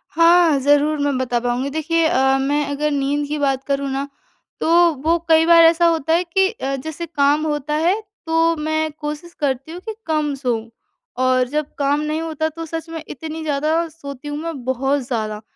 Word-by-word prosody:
हाँ, 335 -2 +5
ज़रूर 290 +2 +3
मैं 285 -2 0
बता 245 -2 0
पाऊँगी। 245 +3 -1
देखिए 315 +3 0
अ, 265 -2 +3
मैं 290 +2 0
अगर 295 +1 -1
नींद 285 +1 -1
की 300 +1 -3
बात 270 -2 0
करूँ 280 0 -1
ना 275 +1 -2 0.5
तो - - -1 0.3
वो 330 +2 +3
कई 320 0 +5
बार 335 0 +7
ऐसा 330 +1 +5
होता 325 -2 +2
है 345 +2 +3
कि 380 +2 +2
अ, 275 - -4
जैसे 315 +5 -6
काम 300 -1 +1
होता 295 -1 -2
है 390 +4 +2 0.3
तो 330 0 +2
मैं 315 +1 -1
कोशिश 300 +3 -7
करती 275 0 -2
हूँ 345 - -7
कि 440 -1 -5
कम 305 -2 0
सोऊँ। 240 -4 -2 0.5
और 255 0 +2
जब 300 +3 -1
काम 285 +1 +1
नहीं 305 +1 -2
होता 315 -1 -2
तो 330 +1 -7
सच 325 +1 -6
में 325 -1 -6
इतनी 320 +3 -7
ज़्यादा 310 +3 0
सोती 285 -3 -10
हूँ 290 0 -4
मैं 315 -4 -5
बहुत 270 +2 0
ज़्यादा। 215 -4 -3
300 Hz, 195 wpm, -20 LUFS, 275-325 Hz, 0.5 s, बार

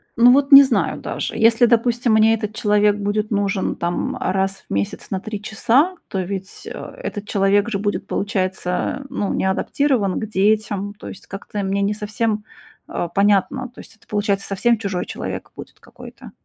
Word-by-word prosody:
Ну, 240 +1 +7
вот 275 +2 +3
не 275 0 +12
знаю 265 -3 0
даже. - - -4
Если, 230 +2 +4
допустим, 235 0 +2
мне 220 +1 +5
этот 215 -1 -3
человек 210 -1 +3
будет 210 +1 -2
нужен 200 -2 0
там 175 +10 -2
раз 190 +1 -1
в - - -4
месяц 100 0 -3
на 190 - -1
3 210 +1 -6
часа, 245 - +2
то 190 - -2
ведь, 190 +1 -6
э, - - -7 0.3
этот 205 - -5
человек 200 +1 +2
же 215 - -1
будет, 205 0 -2
получается, 190 +4 -2
ну, 200 - -2
не - - -1
адаптирован 205 +1 0
к - - -3
детям. 205 0 0
То - - -11
есть - - -12
как-то 200 +1 -6
мне 195 +1 -1
не 200 +1 +1
совсем, 210 0 -2 0.4
а, 175 - -3
понятно. 200 +7 +1
То 250 - -17
есть - - -16
это, 220 - -28
получается, 205 -1 -1
совсем 230 +4 +1
чужой 200 -4 -3
человек - - -6
будет - - -11
какой-то. - - -13
210 Hz, 180 wpm, -20 LUFS, 195-225 Hz, 0.4 s, не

